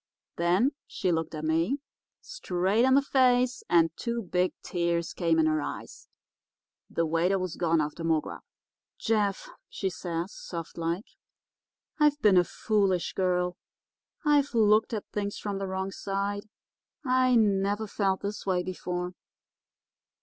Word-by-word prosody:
Then 180 +10 +3 0.2
she 185 -5 -1
looked 160 -1 -1
at 155 0 -4
me, 165 - +1 0.4
straight 215 - 0
in 260 0 +5
the 280 - +4
face, 255 -2 +3
and 165 -1 +4
two 235 -1 -3
big 180 0 +1
tears 170 -1 -1
came 165 -2 +1
in 160 - +4
her 155 -1 +2
eyes. - - -7 0.8
The 165 - 0
waiter 170 +4 +2
was 185 -2 -3
gone 165 -2 +2
after 150 +2 -3
more 165 -1 +3
grub. - - -8 0.6
"'Jeff,' 210 - 0 0.2
she 190 -2 -2
says, 170 +1 -4
soft 165 -2 -7
like, 170 +5 -2 0.9
'I've 295 -1 +4
been 205 -7 +5
a 180 - +6
foolish 195 -2 0
girl. 180 -1 0 0.7
I've 290 -3 +3
looked 215 0 +4
at 215 -3 -3
things 205 -1 -3
from 200 -2 -4
the 195 - -3
wrong 190 +1 -3
side. 200 +2 -3 0.6
I 255 -1 +3
never 205 -1 +2
felt 195 -2 0
this 205 +1 -4
way 185 -2 0
before. 180 0 -4
190 Hz, 140 wpm, -28 LUFS, 170-215 Hz, 0.9 s, a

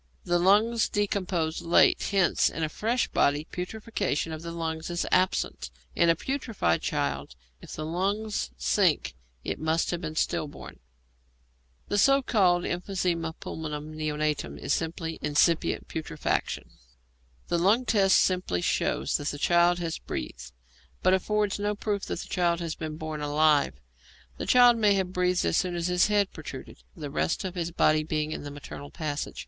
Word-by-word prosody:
The 175 -1 +1
lungs 210 +5 +3
decompose 185 -6 -1
late, 170 0 +4
hence 195 -3 +3
in 165 - -4
a 155 - 0
fresh 230 +9 0
body 145 +2 +2
putrefaction 180 -4 -3
of 155 - -6
the 170 - -6
lungs 160 -1 -4
is 175 0 -1
absent; 185 - +1 0.3
in 170 - +4
a 165 - +5
putrefied 230 - -1
child, 70 -2 -2 0.3
if - - -10
the 155 - -5
lungs 200 - -1
sink, 65 - +2 0.3
it - - -3
must 160 +1 0
have 175 -1 -3
been 155 -2 -5
stillborn. 150 -1 -3 1.1
The 205 - +1
so 275 +5 +5
called 180 -7 +3
emphysema 175 -2 -2
pulmonum 155 -1 -6
neonatorum 150 -1 -2
is - - -1
simply 165 0 -3
incipient 150 +3 +1
putrefaction. 155 - -3 0.8
The 170 - +1
lung 210 +8 +3
test 195 -4 +4
simply 180 - +1
shows - - 0
that 145 - -5
the 145 - -2
child 175 +3 +3
has 165 -2 -3
breathed, 65 +1 -6 0.5
but 185 - +4
affords 210 +2 0
no 205 0 -1
proof 205 -1 -2
that - - -4
the - - -9
child 170 -2 +1
has 165 -2 -3
been 155 -1 -6
born 155 -1 -5
alive. 150 0 +3 0.6
The - - -5
child 245 -1 +6
may 210 -3 +4
have 185 -1 -1
breathed 180 0 +1
as - - +2
soon 180 -2 0
as 175 +1 -1
its 180 0 +4
head 205 -2 +1
protruded, 140 -5 -9
the 145 -3 -6
rest 160 - -1
of 185 -2 -4
the 170 -2 -3
body 155 0 +4
being 155 0 -2
in - - -4
the 145 - -7
maternal 145 0 -9
passages. 150 -3 -4
170 Hz, 165 wpm, -27 LUFS, 155-195 Hz, 1.1 s, child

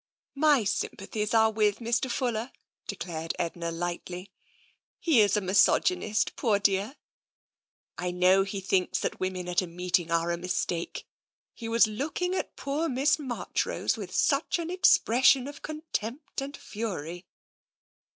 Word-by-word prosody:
" - - -69 0.2
My 270 -6 +4
sympathies 210 +1 -2
are 220 0 +5
with 210 -1 +2
Mr. 235 +2 -1
Fuller," 240 -1 -1 0.4
declared 165 -2 -4
Edna 170 0 -3
lightly. 175 +2 -5 0.3
" - - -33 0.3
He 305 -10 +4
is 205 -1 +3
a - - +1
misogynist, 205 - +2
poor 220 -6 +2
dear. 200 +5 +1 1.0
I 180 - -1
know 180 +2 +4
he 195 0 -3
thinks 185 -1 +1
that - - -3
women 185 -1 -3
at 180 +1 +2
a 185 - -5
meeting 175 0 0
are 170 0 +1
a 170 - -1
mistake; 175 -1 -3 0.5
he 225 -2 -7
was 230 0 +5
looking 300 - -2
at 375 - -3
poor 300 +4 -2
Miss 270 +4 +2
Marchrose 255 -5 -1
with - - -7
such - - +1
an 340 0 -4
expression 270 - +4
of 285 0 -9
contempt 300 -4 -5
and 280 +1 -6
fury! 180 -6 -5
210 Hz, 145 wpm, -28 LUFS, 180-260 Hz, 1.0 s, are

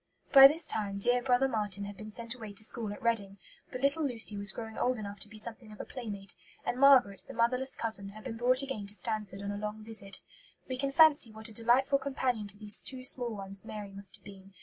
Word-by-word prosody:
By 270 -1 +11
this 315 +4 +6
time 200 -2 -2
dear 245 +5 +3
brother 250 +1 +2
Marten 210 -5 -3
had 200 0 -8
been 215 +1 -9
sent 230 +2 -4
away 220 -5 -9
to 200 - -3
school 220 -1 -1
at 205 - -9
Reading; 205 -4 -1 0.3
but 255 - -6
little 280 +3 +1
Lucy 230 -6 0
was 200 0 +2
growing 220 +1 -8
old 250 0 0
enough 205 -1 -7
to 210 - -6
be 215 - -13
something 225 +1 -7
of 210 - -13
a - - -6
playmate; 205 -6 -6 0.3
and 245 - -2
Margaret, 260 -8 +5
the 270 - -10
motherless 250 +3 +1
cousin, 220 -4 -1
had 215 +2 -12
been 240 -3 -6
brought 255 +3 +2
again 265 -7 -5
to 205 - -3
Stanford 210 -4 -3
on 200 - -3
a 205 - -5
long 210 +1 -6
visit. 215 -3 -4 0.4
We 255 - -4
can 275 +1 -2
fancy 295 -5 +5
what 220 +1 -4
a - - -12
delightful 255 +5 +3
companion 255 -6 -2
to 200 0 -4
these 210 0 +1
two 255 -1 -1
small 245 -3 -1
ones 195 -1 -6
Mary 210 -2 -8
must 195 -1 -11
have 200 - -22
been. 195 -1 -14
220 Hz, 240 wpm, -30 LUFS, 205-255 Hz, 0.4 s, By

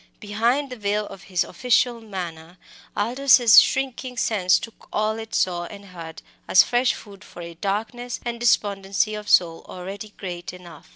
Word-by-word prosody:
Behind 235 +7 0
the - - -5
veil 210 0 -1
of 195 - -11
his 185 -3 0
official 240 +3 +1
manner 175 -5 -7 0.4
Aldous's 240 +1 +6
shrinking 260 -1 -2
sense 190 -5 +2
took 230 - -10
all 215 +1 -1
it 225 0 -7
saw 175 -2 0
and 200 +2 -11
heard 165 -3 -10 0.2
as 185 - +7
fresh 245 +1 +1
food 200 -1 -13
for 175 - -11
a 170 0 -8
darkness 220 +7 -3
and 235 -1 -3
despondency 205 -3 +1
of 210 0 -6
soul 165 -2 +3
already 195 +3 -7
great 175 -2 -6
enough. 175 -4 -13
205 Hz, 160 wpm, -23 LUFS, 180-235 Hz, 0.4 s, as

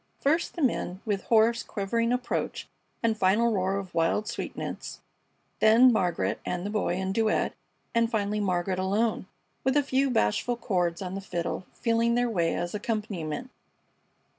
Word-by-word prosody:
First 315 +5 +1
the 335 - -2
men, 190 -7 0
with 205 -3 -1
hoarse, 230 +1 +4
quavering 230 +3 -1
approach 250 0 -2 0.4
and 225 -1 +2
final 215 +4 +3
roar 190 0 0
of 190 -3 -6
wild 170 +6 +1
sweetness; 235 - -5 0.6
then 235 +3 +7
Margaret 180 -6 0
and 180 +1 -3
the 205 - -3
Boy 210 -4 0
in 190 +1 -2
duet, 220 0 +1 0.4
and 230 0 +3
finally 210 -2 0
Margaret 185 -1 0
alone, 205 +2 0 0.4
with 265 +2 +2
a 290 - +4
few 270 0 +1
bashful 240 - +1
chords 180 -5 -1
on 185 0 -5
the 195 - -4
fiddle, 175 -1 -3
feeling 230 0 +1
their 245 -1 +1
way 170 -5 +1
as 175 0 -3
accompaniment. 210 -1 -3
210 Hz, 155 wpm, -27 LUFS, 185-235 Hz, 0.6 s, then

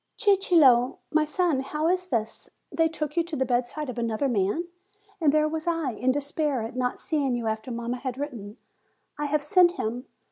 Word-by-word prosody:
"Cicillo, 320 - +4
my 310 0 +3
son, 320 -2 +1
how 300 +4 -2
is 365 +1 0
this? 225 -7 -3 0.2
They 325 0 +2
took 305 -2 -4
you 340 - +3
to 335 -1 -5
the 265 - 0
bedside 250 +4 -1
of 245 -2 -5
another 230 +3 0
man. 210 - 0 0.6
And 300 -3 +4
there 305 +1 +3
was 315 +1 -4
I, 330 -6 0
in 250 +3 0
despair 285 -2 -1
at 225 +2 -6
not 250 -1 -1
seeing 280 -5 0
you 240 -1 -3
after 220 +2 -3
mamma 235 +1 -3
had 255 0 -5
written, 240 -7 -6 0.6
'I 295 - -1
have 295 0 0
sent 350 +3 +5
him.' 245 - -4
280 Hz, 190 wpm, -26 LUFS, 240-315 Hz, 0.6 s, sent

